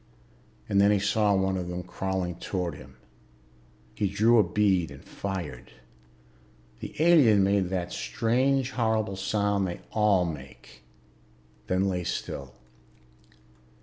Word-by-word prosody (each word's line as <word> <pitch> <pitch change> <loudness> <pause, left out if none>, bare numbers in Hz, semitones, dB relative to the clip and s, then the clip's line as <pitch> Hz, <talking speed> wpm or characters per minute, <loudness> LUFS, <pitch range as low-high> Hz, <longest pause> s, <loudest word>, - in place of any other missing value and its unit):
And 100 0 +3
then 100 - +5
he 105 - +4
saw 105 +1 +2
one 95 0 +1
of 90 -1 -4
them 90 0 -5
crawling 95 0 -3
toward 90 -4 -3
him. - - -13 1.0
He 105 - -1
drew 110 +4 +4
a - - +6
bead 95 -7 +1
and 70 - -13
fired. 95 -3 -6 1.1
The - - -8
alien 145 - +5
made 100 -2 +1
that 90 -2 -3
strange 125 - 0
horrible 110 -4 0
sound 100 0 0
they 85 - -6
all 105 -4 +3
make, 75 -5 -9 0.9
then 95 +1 +1
lay 90 -2 -1
still. 70 -6 -5
95 Hz, 125 wpm, -27 LUFS, 90-105 Hz, 1.1 s, a